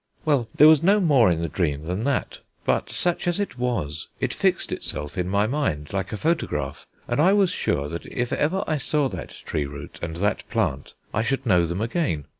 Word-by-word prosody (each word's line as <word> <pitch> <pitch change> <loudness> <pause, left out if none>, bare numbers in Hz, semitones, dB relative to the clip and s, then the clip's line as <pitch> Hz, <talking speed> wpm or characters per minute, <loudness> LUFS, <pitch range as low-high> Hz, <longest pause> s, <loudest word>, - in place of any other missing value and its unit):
Well, 140 -7 +2
there 150 - +8
was 155 -2 +7
no 200 +5 +4
more 140 - +5
in 85 -1 0
the - - 0
dream 75 -2 -1
than 90 +8 -3
that: 140 -2 -1 0.3
but, - - +1
such 175 0 0
as 175 +2 +1
it 200 -11 -3
was, 85 -12 -2
it - - -1
fixed - - +1
itself 75 +3 -4
in 90 -1 -1
my 100 +2 +2
mind 110 - -2
like 95 0 -2
a 105 - -3
photograph, 75 - -1 0.2
and - - -1
I 180 +6 +5
was 200 -3 +3
sure 70 - -1
that 85 +3 -6
if 120 0 -2
ever 185 +7 +1
I 155 - 0
saw 145 +1 +1
that - - -6 0.2
tree 75 -2 -1
root 70 0 -9
and 80 -1 -4
that 100 +4 -1
plant, 65 +1 -1 0.2
I 110 - +1
should 135 +3 -1
know 90 -6 +4
them 85 +5 -3
again. 115 - -1
110 Hz, 215 wpm, -24 LUFS, -, 0.3 s, there